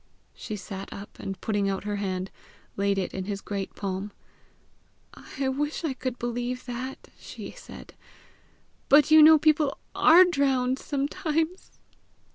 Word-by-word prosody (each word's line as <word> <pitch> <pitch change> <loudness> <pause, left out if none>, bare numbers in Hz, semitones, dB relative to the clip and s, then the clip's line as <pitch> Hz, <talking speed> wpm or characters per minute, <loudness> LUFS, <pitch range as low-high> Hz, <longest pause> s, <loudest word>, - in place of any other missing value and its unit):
She 215 - -6
sat 195 0 -8
up, 200 +1 -10
and 195 -1 -6
putting 205 -2 0
out 195 -1 -3
her 205 0 -3
hand, 190 -1 -3 0.4
laid 200 0 0
it 190 - -2
in 190 -1 -4
his 200 0 -4
great 200 -1 -5
palm. 195 +1 -4 1.0
"I 270 0 -5
wish 295 +5 -2
I 310 -5 -1
could 255 -1 -4
believe 245 +1 -3
that!" 255 +1 -6
she - - -9
said; - - -12 1.0
"but 290 +1 +6
you 315 0 +9
know 315 +1 +9
people 305 -2 +2 0.2
ARE 345 +4 +7
drowned 270 -6 +1
sometimes!" 315 +4 -2
250 Hz, 140 wpm, -26 LUFS, 200-295 Hz, 1.0 s, you